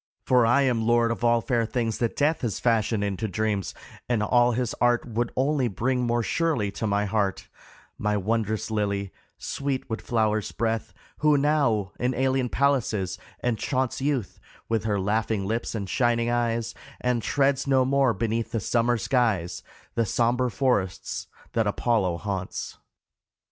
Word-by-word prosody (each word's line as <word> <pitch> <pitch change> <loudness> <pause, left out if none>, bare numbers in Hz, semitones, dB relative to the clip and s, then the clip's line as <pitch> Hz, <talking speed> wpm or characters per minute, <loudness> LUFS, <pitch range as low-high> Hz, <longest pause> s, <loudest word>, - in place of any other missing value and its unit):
For 125 -3 +4
I 125 +4 +4
am 125 -4 +1
lord 120 0 +3
of 115 - -4
all 120 0 +4
fair 120 -1 +1
things 115 -1 -2
that 120 -2 0
Death 150 +3 +1
Has 115 -7 -2
fashioned 110 -3 +1
into 100 +2 -2
dreams, 105 -1 -2 0.3
and 115 -3 +1
all 120 +2 +4
his 120 0 -1
art 120 -1 +3
Would 120 -1 -2
only 135 -1 +1
bring 125 +4 0
more 120 0 +1
surely 145 -9 0
to 110 +2 -3
my 100 0 +1
heart 100 -2 -1 0.5
My 105 0 +1
wondrous 110 +2 -1
Lily, 100 -2 -1 0.3
sweet 140 -2 -3
with 110 - -2
flowers' 110 -3 0
breath, 115 0 -1 0.3
Who 150 -1 +4
now, 135 -9 +2
in 125 +1 0
alien 130 -1 +1
palaces, 115 -10 0 0.2
enchaunts 130 +2 -1
Youth, 135 -7 -1 0.3
with 115 -1 -1
her 105 -2 +1
laughing 105 +1 0
lips 115 +3 -2
and 100 -3 -3
shining 120 0 +1
eyes, 115 -1 0 0.3
And 125 -1 0
treads 140 +2 +1
no 130 -2 +4
more 135 -1 +3
beneath 115 +3 -2
the 115 - +1
summer 120 +4 +1
skies 100 -9 0 0.3
The 115 -2 0
sombre 125 +3 +1
forests 120 -8 -1 0.3
that 115 -2 +1
Apollo 100 -4 +1
haunts. 95 -1 -4
115 Hz, 155 wpm, -26 LUFS, 105-125 Hz, 0.5 s, For